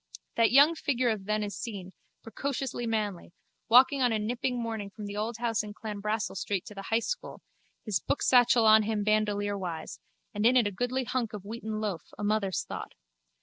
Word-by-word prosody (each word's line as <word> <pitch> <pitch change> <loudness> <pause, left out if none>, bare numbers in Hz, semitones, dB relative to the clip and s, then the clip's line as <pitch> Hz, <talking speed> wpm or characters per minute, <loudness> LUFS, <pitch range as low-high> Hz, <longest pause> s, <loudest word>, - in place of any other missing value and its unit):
That 230 -1 +4
young 285 +5 +7
figure 255 -6 0
of 205 -3 -4
then 215 +1 0
is 205 -1 -4
seen, 195 -6 -6 0.3
precociously 265 0 -3
manly, 210 -6 -2 0.4
walking 260 +3 +6
on 245 -2 +3
a 220 - +1
nipping 245 +3 -2
morning 225 -3 -4
from 210 +1 -9
the 205 0 -6
old 220 +2 -3
house 230 -1 0
in 210 -1 -9
Clanbrassil 210 -1 -3
street 195 -2 -2
to - - -9
the 195 -1 -8
high 225 - +3
school, - - -4 0.5
his 210 -5 0
booksatchel 245 -4 +3
on 220 0 +7
him 215 -1 -1
bandolierwise, 205 -5 -1 0.3
and 210 - -2
in 245 +3 +5
it 240 - +4
a 205 - 0
goodly 245 +6 -1
hunk 240 -3 -2
of 200 -2 -7
wheaten 220 0 -5
loaf, 200 -7 -2 0.2
a - - -5
mother's 205 -2 0
thought. - - -7
215 Hz, 190 wpm, -29 LUFS, 205-240 Hz, 0.5 s, young